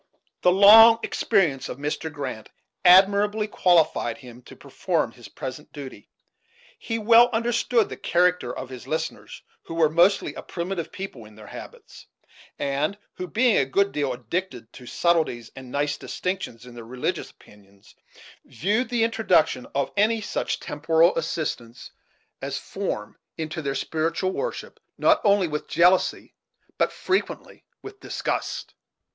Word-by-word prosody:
The 180 - +4
long 220 +4 +9
experience 180 - 0
of - - -6
Mr. 150 +2 -4
Grant 135 -7 -6 0.3
admirably 200 +3 +5
qualified 165 - +2
him 125 -1 -13
to - - -12
perform 155 -1 -2
his 120 -3 -14
present 130 +8 -8
duty. 135 -8 -10 0.7
He 225 - -3
well 230 +2 +6
understood 235 0 +1
the - - -8
character 180 +1 +1
of 130 - -7
his 130 -1 -10
listeners, 160 +2 -5 0.2
who 165 - -9
were 160 -2 +3
mostly 175 +5 +3
a - - -8
primitive 175 -1 -5
people 160 - -8
in 105 0 -16
their 105 0 -13
habits; - - -12 0.5
and 145 +7 -1 0.2
who, 180 - -6
being 230 +3 +2
a 135 - +3
good 200 +9 +1
deal 145 -3 -1
addicted 125 - -5
to 125 -2 -12
subtleties 160 -10 0
and 130 -2 -10
nice 145 +1 -1
distinctions 180 -13 -5
in 125 - -12
their 120 -1 -10
religious 125 +2 -4
opinions, 100 -1 -21 0.5
viewed 210 - -1
the 240 -2 +1
introduction 220 - +1
of 140 0 0
any 220 +3 +2
such 210 - -3
temporal 160 +3 +2
assistance 150 -7 -4 0.5
as - - -3
form - - -5 0.2
into 160 0 -4
their 140 -2 -3
spiritual 165 +5 -1
worship - - -5 0.2
not 315 0 +3
only 200 -3 +3
with 150 -1 -4
jealousy, 180 +3 +2 0.5
but - - +2
frequently 375 +1 -3 0.2
with 405 0 -10
disgust. - - -4
165 Hz, 140 wpm, -24 LUFS, 135-200 Hz, 0.7 s, long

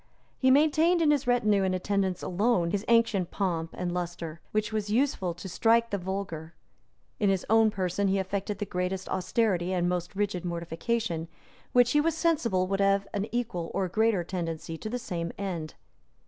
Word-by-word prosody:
He 260 - +4
maintained, 315 +5 +4
in 315 -3 +4
his 285 -3 +1
retinue 215 -5 +3
and 190 -1 +1
attendants 190 -1 -1
alone, 185 -2 +1
his 200 +1 -1
ancient 230 -6 +3
pomp 170 -5 -1
and 175 -1 -2
lustre, 175 -2 -4
which 215 0 -1
was 210 -1 -2
useful 215 -7 +1
to 180 - -8
strike 230 +5 +2
the 200 - -1
vulgar; 175 -4 -5 0.6
in 205 -3 +3
his 190 -2 0
own 225 0 +6
person 195 0 -1
he 195 +1 +2
affected 195 +2 -2
the 205 - -3
greatest 180 0 -3
austerity 185 -2 0
and 175 -1 +1
most 180 +1 -2
rigid 200 -3 -1
mortification, 170 +1 -2 0.4
which 245 -1 +5
he 295 - +4
was 325 +1 0
sensible 245 - +1
would 195 +1 -1
have 195 0 +2
an 205 0 -1
equal 210 -8 -2
or 190 - +1
a - - -4
greater 220 -1 +2
tendency 165 -2 -4
to 215 - -6
the 245 - -2
same 170 -8 -4
end. 175 -6 -4
195 Hz, 180 wpm, -28 LUFS, 175-225 Hz, 0.6 s, own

